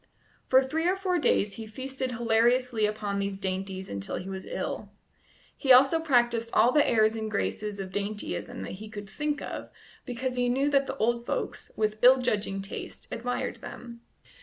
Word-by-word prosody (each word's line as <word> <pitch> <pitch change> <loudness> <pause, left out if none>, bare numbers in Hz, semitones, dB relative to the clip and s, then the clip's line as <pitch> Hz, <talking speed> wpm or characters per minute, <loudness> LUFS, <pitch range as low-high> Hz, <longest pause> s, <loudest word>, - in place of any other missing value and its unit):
For 260 +1 +6
three 320 +5 -1
or 370 - +3
four 370 -2 0
days 205 -8 +2
he 220 -1 -6
feasted 260 +3 -4
hilariously 235 0 +2
upon 210 -1 -2
these 200 0 -2
dainties 190 0 -4
until 100 0 -4
he 185 - -5
was 190 0 -6
ill. - - -4 0.7
He 270 - +1
also 270 +6 +7
practised 240 -6 +2
all 235 +3 +5
the 295 +2 +4
airs 220 -1 +4
and 220 -1 -3
graces 210 0 -2
of 190 -1 -5
dandyism 210 +4 -3
that - - -6
he 215 - -8
could 205 -2 -7
think 295 +7 -2
of, - - -6 0.3
because 255 0 -3
he 245 0 +2
knew 275 +4 +1
that 275 -1 +3
the 270 - -4
old 235 +1 0
folks, - - -3
with 215 0 0
ill 255 +2 +8
judging 205 -6 -1
taste, 195 - -7
admired 245 +2 -2
them. 235 -1 -10
235 Hz, 180 wpm, -28 LUFS, 210-260 Hz, 0.7 s, ill